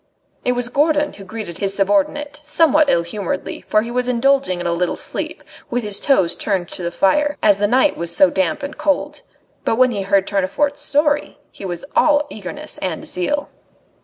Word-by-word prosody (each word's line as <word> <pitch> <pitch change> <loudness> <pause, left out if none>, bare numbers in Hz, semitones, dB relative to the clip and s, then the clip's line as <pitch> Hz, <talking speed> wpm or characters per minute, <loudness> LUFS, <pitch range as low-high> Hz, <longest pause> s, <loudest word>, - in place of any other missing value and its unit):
It 250 - +1
was 245 0 0
Gourdon 295 +3 +1
who 200 - -11
greeted 195 -3 -7
his 195 -1 0
subordinate, 205 +10 0
somewhat 305 -1 +3
ill 170 - +3
humouredly, 185 +2 -4
for 215 0 +3
he 235 - -6
was 250 0 0
indulging 250 -5 +2
in 175 - -5
a 170 - +1
little 175 +1 -1
sleep, - - -5 0.3
with 245 0 -1
his 205 -2 -1
toes 190 -12 +2
turned 190 -4 -1
to - - -6
the 170 - -1
fire, 295 +12 +2
as 205 -2 +5
the 205 - +2
night 260 +6 +3
was 170 0 -3
so 190 -2 +6
damp 190 +5 0
and 285 +1 -6
cold. 300 - 0 0.4
But - - +1
when 255 +1 +4
he 205 -4 -2
heard 195 0 +2
Tournefort's 215 +10 0
story, 295 0 +1
he 200 - -10
was 175 +7 -5
all 295 -1 +4
eagerness 220 +10 -6
and 180 -4 -3
zeal. 285 +12 -1
225 Hz, 190 wpm, -19 LUFS, 190-290 Hz, 0.4 s, so